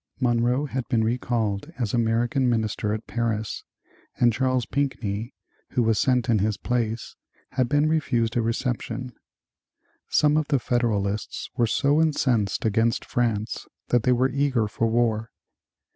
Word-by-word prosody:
Monroe 125 +2 +2
had 130 -3 -4
been 115 -2 +2
recalled 115 +1 -1
as 115 -6 -2
American 120 +2 +1
Minister 110 -2 0
at 110 +1 -3
Paris 110 -3 -2 0.5
and 120 -1 +3
Charles 130 0 +1
Pinckney, 120 -5 -2 0.4
who 125 - +2
was 110 -1 +2
sent 125 -3 +2
in 115 -3 +3
his 105 +1 0
place, 115 -2 -2 0.4
had 125 -2 0
been 145 +2 +3
refused 120 -8 +1
a 120 - +2
reception. 120 +1 -2 1.0
Some 150 0 +3
of 155 -2 0
the 140 - +2
Federalists 110 -5 -1
were 120 -3 +2
so 145 +6 +2
incensed 125 -11 +1
against 115 +2 +1
France 115 -3 -1 0.2
that 120 - +3
they 125 - +2
were 130 +2 +2
eager 135 -5 +1
for 115 +2 -1
war. 115 -1 +1
120 Hz, 145 wpm, -25 LUFS, 110-130 Hz, 1.0 s, and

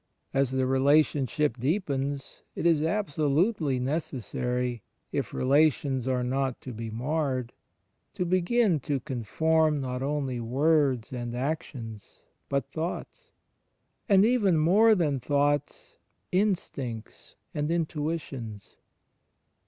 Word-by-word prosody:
As 135 -1 +2
the 130 0 0
relationship 140 +1 +2
deepens, 140 - -2
it - - -3
is 165 -3 +4
absolutely 160 - +1
necessary, 125 -3 -2 0.3
if - - -2
relations 135 -2 +2
are 125 -1 +1
not 130 0 -1
to 130 - -7
be 115 0 -5
marred, 130 +1 -2 0.6
to 180 -3 -1
begin 185 +1 +2
to 140 +1 -2
conform 150 +6 +1
not 125 -1 -3
only 135 -3 -1
words 135 0 +1
and 120 -1 -4
actions, 125 -6 -5 0.3
but 140 -2 0
thoughts; 180 - -5 0.8
and 195 0 +6
even 215 -8 +3
more 205 +8 +5
than 150 -7 +1
thoughts 145 +2 -1 0.2
— - - -47
instincts 140 - -2 0.2
and 150 +1 -1
intuitions. 150 -9 -3
140 Hz, 105 wpm, -28 LUFS, 130-160 Hz, 0.8 s, and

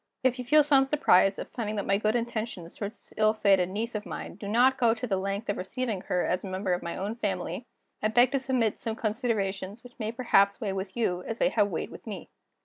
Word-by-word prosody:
"If 255 0 +2
you 250 - -4
feel 300 +4 +6
some 275 -2 +4
surprise 195 -9 +4
at - - -7
finding 215 -3 -3
that 200 - -2
my 195 0 +2
good 215 +1 +1
intentions 225 -7 -3
toward 205 +1 -5
this - - -17
ill 215 0 +4
fated 195 -4 +3
niece 220 +5 -3
of 210 -1 -3
mine - - -6
do 200 - -8
not 250 +5 +4
go 230 -2 +4
to 235 - -4
the 205 -5 0
length 195 +3 -3
of 205 - -1
receiving 215 +1 -3
her 180 -1 0
as 180 - -1
a - - -5
member 185 0 -1
of 175 - -1
my 170 - -5
own 200 +3 -2
family, 235 - -3 0.3
I - - +2
beg 240 +3 +4
to 275 - +1
submit 255 -5 0
some 225 -2 -3
considerations 210 -2 -2
which 245 0 -15
may 220 -1 -2
perhaps 200 -5 +3
weigh 200 -3 -2
with 190 +2 -5
you 180 -6 0
as 225 - -3
they - - +3
have 210 -3 +2
weighed 175 -5 -4
with - - -12
me. - - -7
215 Hz, 245 wpm, -28 LUFS, 195-240 Hz, 0.3 s, feel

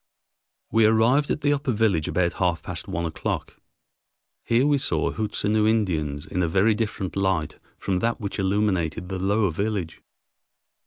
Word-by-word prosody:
We 115 -1 +4
arrived 115 +6 +3
at 150 - -1
the 145 0 +3
upper 140 -2 -1
village 105 -8 +1
about 85 -1 +1
half 85 -3 +1
past - - -6
one 85 +1 -2
o'clock. 80 - -4 0.9
Here 120 +3 +2
we 145 -1 +3
saw 135 - 0
Hootsenoo 105 0 0
Indians 80 -10 -1
in 90 - -2
a 85 - +1
very 100 +6 +3
different 105 -3 -3
light 95 -5 -1 0.2
from 95 -2 -1
that 115 +3 -1
which 100 -2 -4
illumined 95 -4 +1
the 95 +1 -6
lower 100 0 +1
village. 100 -2 -3
100 Hz, 155 wpm, -24 LUFS, 90-110 Hz, 0.9 s, We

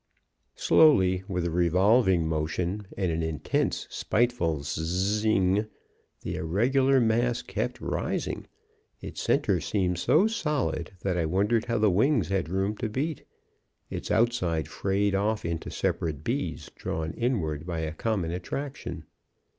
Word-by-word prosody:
"Slowly, 95 -13 +5
with 90 -3 -2
a 85 - -1
revolving 90 +1 +3
motion 85 +6 -2
and 95 -3 0
an 80 +1 -1
intense, 80 -3 -1
spiteful 105 - 0
sszzzzz 90 +9 -1
ing, 100 0 +2 0.5
the - - -4
irregular 130 +10 +2
mass 120 +1 +1
kept - - -3
rising. - - -3 0.5
Its - - -7
center - - +2
seemed 90 -4 0
so 195 - +4
solid 150 - -1
that 90 -2 0
I 80 - +1
wondered 100 +6 +1
how 115 -1 0
the 105 -2 +3
wings 110 - +2
had 95 -5 0
room 95 +3 0
to 115 - -2
beat. 145 +7 -3 0.7
Its - - -5
outside 105 - +1
frayed 100 +5 0
off 105 +2 0
into 85 -1 -3
separate 75 -3 -2
bees, - - -3
drawn 80 0 -3
inward 85 - -1
by 85 -2 -2
a 80 0 -3
common 95 -2 -1
attraction. 110 - -5
95 Hz, 135 wpm, -27 LUFS, 85-115 Hz, 0.7 s, Slowly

